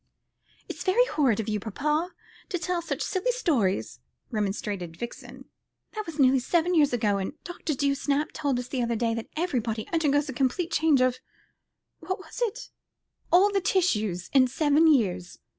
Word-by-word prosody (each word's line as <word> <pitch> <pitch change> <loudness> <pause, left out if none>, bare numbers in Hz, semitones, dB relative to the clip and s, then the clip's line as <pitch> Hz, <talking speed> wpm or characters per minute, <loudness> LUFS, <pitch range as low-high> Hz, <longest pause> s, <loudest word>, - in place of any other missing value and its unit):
"It's - - -6
very 435 +6 +4
horrid 270 - +1
of 220 - -3
you, 210 -1 -1
papa, 300 - -1 0.4
to 370 - -1
tell 355 0 -2
such 335 - -3
silly 375 +4 -2
old - - +2
stories," 255 - 0 0.3
remonstrated 200 -5 -3
Vixen. 235 +4 -8 0.5
"That 430 -3 -5
was 325 -2 -7
nearly 265 -2 +5
seven 340 +7 +1
years 300 -4 +4
ago, 210 -5 +1
and 190 +7 -3
Dr. 345 -4 -4
Dewsnap 280 +1 0
told 280 -4 -1
us 245 0 -4
the 260 - -2
other 235 -1 0
day 230 0 0
that 230 0 -5
everybody 235 -10 -1
undergoes 295 -3 +2
a 265 - -4
complete 275 +7 0
change 305 -4 +3
of 255 0 +2 0.8
what 375 - -3 0.2
is - - -7
it? 475 +1 -2 0.6
all 385 +4 +6
the 395 -1 +1
tissues 215 - 0
in 260 -2 +6
seven 300 +4 +3
years. 185 -10 0
280 Hz, 170 wpm, -27 LUFS, 230-340 Hz, 0.8 s, all